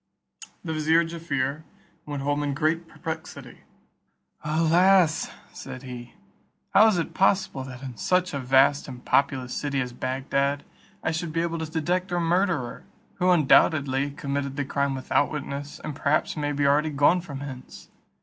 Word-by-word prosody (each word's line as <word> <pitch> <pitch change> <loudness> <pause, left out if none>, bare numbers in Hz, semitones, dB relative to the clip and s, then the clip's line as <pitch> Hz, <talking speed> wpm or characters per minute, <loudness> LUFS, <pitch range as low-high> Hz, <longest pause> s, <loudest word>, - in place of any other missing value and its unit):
The 160 -3 -3
vizier 160 +2 +3
Jaaffier 160 -4 -3 0.4
went 145 -2 -4
home 145 +1 0
in 145 -1 -1
great 165 +3 0
perplexity. 160 -1 -7 0.8
"Alas!" 165 +3 +3 0.2
said 130 - -8
he 125 -2 -9 0.6
"how 220 - +7
is 215 -5 +3
it 165 - -2
possible 190 -8 +1
that 130 0 -9
in 130 -3 -7
such 180 -1 +1
a 140 - -2
vast 135 +2 +3
and 125 -2 -10
populous 135 -3 +1
city 140 -2 -2
as 125 -2 -3
Bagdad, 140 +3 -1 0.4
I - - 0
should 160 0 -4
he 165 - +1
able 165 -1 -2
to 160 -1 -4
detect 180 +3 -1
a 175 - +1
murderer, 170 -6 0 0.4
who 180 0 +3
undoubtedly 145 -4 +4
committed 140 -1 -3
the 145 -1 -2
crime 140 0 -1
without 130 +2 +1
witness, 140 -1 -6
and 150 - -5
perhaps 145 +1 0
may 145 -1 -1
be 145 0 0
already 150 +2 +3
gone 145 +5 +3
from 140 -5 -8
hence? 130 -3 -9
145 Hz, 160 wpm, -25 LUFS, 135-165 Hz, 0.8 s, how